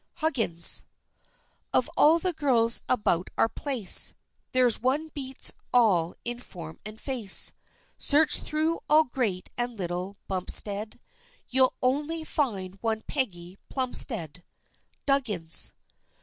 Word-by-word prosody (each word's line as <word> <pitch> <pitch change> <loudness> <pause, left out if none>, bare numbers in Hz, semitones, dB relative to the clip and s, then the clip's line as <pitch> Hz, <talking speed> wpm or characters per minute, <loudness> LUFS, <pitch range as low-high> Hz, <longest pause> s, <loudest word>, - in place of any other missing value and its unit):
HUGGINS. 230 - +2 0.9
Of - - +2
all 315 +3 +5
the 360 +1 0
girls 240 -7 +1
about 185 -7 +1
our - - +3
place, 240 -6 +2 0.4
There's 250 -3 +2
one 280 +6 0
beats 270 -3 -1 0.2
all 185 -9 +3
in 240 0 -4
form 165 -9 -10
and 215 +1 -10
face; 240 -8 +3 0.5
Search 295 +2 +4
through 315 +2 -2
all 310 +1 +6
Great 235 -9 -3
and 240 -1 -2
Little 180 +2 -4
Bumpstead, 200 +3 0 0.5
You'll 260 0 +3
only 295 +5 -1
find 200 -12 -3
one 220 -1 -2
Peggy 190 -10 -4
Plumstead. 225 - 0 0.6
DUGGINS. 215 - +2
240 Hz, 110 wpm, -26 LUFS, 190-275 Hz, 0.9 s, all